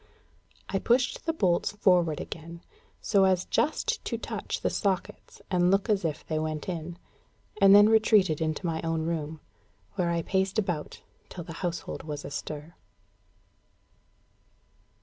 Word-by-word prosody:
I 195 Hz, -, 0 dB
pushed 245 Hz, -, +1 dB
the -, -, +3 dB
bolts 190 Hz, -, +1 dB
forward 180 Hz, -7 st, +3 dB
again, 170 Hz, +1 st, -8 dB, 0.4 s
so 200 Hz, -2 st, +3 dB
as 185 Hz, -1 st, +2 dB
just 305 Hz, -, 0 dB
to -, -, -2 dB
touch -, -, -4 dB
the -, -, 0 dB
sockets 195 Hz, -3 st, -3 dB
and 180 Hz, -1 st, +3 dB
look 195 Hz, +3 st, +2 dB
as 200 Hz, -3 st, +1 dB
if 160 Hz, -3 st, -3 dB
they 155 Hz, -1 st, -1 dB
went 155 Hz, -1 st, -3 dB
in, 170 Hz, -1 st, -5 dB, 0.6 s
and 195 Hz, 0 st, +8 dB
then 205 Hz, +1 st, +8 dB
retreated 215 Hz, -7 st, +4 dB
into 155 Hz, +3 st, -2 dB
my 160 Hz, -1 st, -1 dB
own 165 Hz, -1 st, -1 dB
room, 160 Hz, -2 st, -3 dB, 0.6 s
where 175 Hz, -2 st, +1 dB
I 170 Hz, -1 st, 0 dB
paced 190 Hz, +3 st, 0 dB
about 175 Hz, -8 st, -2 dB, 0.3 s
till 175 Hz, -, -7 dB
the 165 Hz, -, -8 dB
household 175 Hz, -2 st, -3 dB
was 150 Hz, -2 st, -6 dB
astir. 150 Hz, +3 st, -6 dB
175 Hz, 145 wpm, -28 LUFS, 160-195 Hz, 0.6 s, and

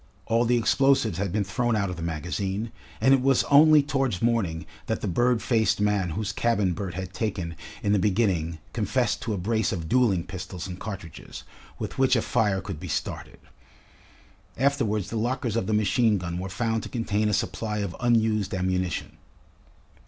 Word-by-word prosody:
All 115 Hz, +1 st, +2 dB
the 120 Hz, +1 st, +3 dB
explosives 120 Hz, -, +2 dB
had 100 Hz, -2 st, -1 dB
been 105 Hz, +2 st, +1 dB
thrown 120 Hz, +5 st, 0 dB
out 100 Hz, -3 st, 0 dB
of -, -, -5 dB
the 85 Hz, -, -8 dB
magazine, 95 Hz, +7 st, -3 dB, 0.3 s
and 135 Hz, -, +5 dB
it 135 Hz, -, +4 dB
was 135 Hz, 0 st, +3 dB
only 150 Hz, +1 st, +7 dB
towards 135 Hz, -9 st, 0 dB
morning 100 Hz, -9 st, 0 dB, 0.2 s
that -, -, -1 dB
the -, -, -2 dB
bird 120 Hz, +6 st, +2 dB
faced 110 Hz, -4 st, +2 dB
man 105 Hz, -3 st, +1 dB
whose 105 Hz, -1 st, -1 dB
cabin 105 Hz, -3 st, +1 dB
Bert 90 Hz, -1 st, -5 dB
had 95 Hz, 0 st, -5 dB
taken 90 Hz, -4 st, -3 dB, 0.3 s
in 100 Hz, -, +1 dB
the 105 Hz, -, +3 dB
beginning 90 Hz, -5 st, +1 dB, 0.2 s
confessed 110 Hz, +1 st, 0 dB
to 110 Hz, -, -2 dB
a -, -, -4 dB
brace 110 Hz, +2 st, 0 dB
of 85 Hz, -4 st, -4 dB
duelling 100 Hz, -4 st, +3 dB
pistols 90 Hz, -1 st, -7 dB
and 90 Hz, -1 st, -7 dB
cartridges, 95 Hz, -7 st, -8 dB, 0.3 s
with -, -, -5 dB
which 130 Hz, -1 st, +4 dB
a 115 Hz, -, +1 dB
fire 105 Hz, -5 st, +1 dB
could 95 Hz, -7 st, -6 dB
be -, -, -7 dB
started. -, -, -4 dB, 1.2 s
Afterwards 115 Hz, -, 0 dB
the 115 Hz, -, -2 dB
lockers 120 Hz, 0 st, -1 dB
of 115 Hz, -5 st, -1 dB
the -, -, -1 dB
machine 105 Hz, +1 st, +3 dB
gun 90 Hz, -1 st, -4 dB
were 95 Hz, +1 st, -4 dB
found 115 Hz, +3 st, -1 dB
to -, -, -7 dB
contain 110 Hz, -3 st, 0 dB
a -, -, +1 dB
supply 105 Hz, +1 st, -2 dB
of 100 Hz, -4 st, -3 dB
unused 110 Hz, -4 st, +2 dB
ammunition. 90 Hz, -2 st, -2 dB
105 Hz, 180 wpm, -26 LUFS, 95-120 Hz, 1.2 s, only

